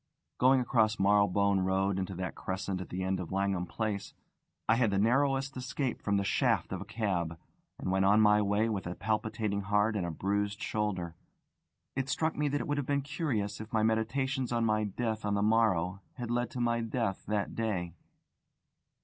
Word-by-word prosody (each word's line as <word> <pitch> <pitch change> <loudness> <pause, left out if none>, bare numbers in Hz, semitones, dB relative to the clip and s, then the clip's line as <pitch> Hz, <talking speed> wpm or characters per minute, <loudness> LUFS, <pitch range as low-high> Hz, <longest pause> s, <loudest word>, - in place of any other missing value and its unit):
Going 130 +1 +5
across 110 -4 +2
Marylebone 100 0 +3
Road 95 +1 +1
into 95 0 -3
that 90 -1 -4
crescent 95 0 -3
at 95 - -8
the 95 +1 -3
end 95 0 0
of 90 - -6
Langham 95 -2 0
Place, 110 -3 -3 0.5
I 115 - +5
had 115 -1 +3
the 100 - 0
narrowest 135 +5 +2
escape 130 0 -3
from 100 -1 +1
the 100 - +1
shaft 100 - +1
of - - -4
a - - -6
cab, 90 -7 -2 0.4
and 95 - -3
went 95 0 +2
on 100 +2 +5
my 105 -1 +5
way 105 +2 +2
with 100 -5 -2
a 90 - -4
palpitating 110 -1 -1
heart 105 +2 +1
and 100 - 0
a 85 - -2
bruised 100 +4 -1
shoulder. 95 -6 -2 0.8
It 135 0 -2
struck 160 +3 0
me 150 0 0
that 145 0 0
it - - -5
would 145 0 0
have 140 - -3
been 140 -1 +1
curious 135 - -2
if 110 +2 -9
my 110 -1 +2
meditations 125 +4 0
on 115 -1 +1
my 110 -1 +2
death 110 +2 -2
on 105 0 0
the 100 - +1
morrow 100 -4 +2
had 120 -2 -4
led 120 0 0
to 125 - -6
my 115 -1 +1
death 115 -3 -2
that 105 -1 -1
day. 95 -7 -2
105 Hz, 195 wpm, -31 LUFS, 95-120 Hz, 0.8 s, Going